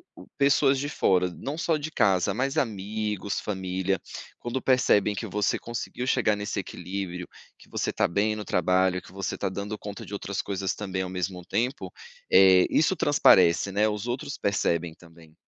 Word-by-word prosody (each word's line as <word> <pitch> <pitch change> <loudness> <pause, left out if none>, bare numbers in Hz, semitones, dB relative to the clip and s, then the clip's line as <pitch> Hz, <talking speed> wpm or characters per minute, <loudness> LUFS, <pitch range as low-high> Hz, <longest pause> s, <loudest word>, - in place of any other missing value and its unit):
o - - -12
o - - -18
pessoas 140 -1 +3
de 145 - -2
fora, 90 -10 +2
não 140 +3 -5
só 165 -1 +1
de 155 +1 -4
casa, 95 - +2
mas 135 +7 -1
amigos, 105 -4 -2
família, 95 -1 -2 0.4
quando 120 +2 -3
percebem 115 -5 +3
que 110 +3 -5
você 105 0 0
conseguiu 120 +2 -5
chegar 115 -5 +2
nesse 105 0 -3
equilíbrio, 90 0 -6 0.3
que - - -19
você - - -2
está - - +1
bem 100 +5 +1
no 105 - -6
trabalho, 90 +1 +2
que - - -16
você 95 0 -4
está - - -2
dando 100 +3 -5
conta 100 -1 -8
de - - -10
outras 100 -1 -3
coisas 95 -1 -2
também 95 -2 -4
ao 95 - -4
mesmo 90 0 -4
tempo, 125 +8 -2 0.4
eh, 95 -1 +7
isso 160 +5 +2
transparece 95 - +4
né, 105 +2 +3
os 105 +2 -4
outros 130 +4 -4
percebem 85 -4 0
também. 80 -2 -18
100 Hz, 180 wpm, -26 LUFS, 95-120 Hz, 0.4 s, eh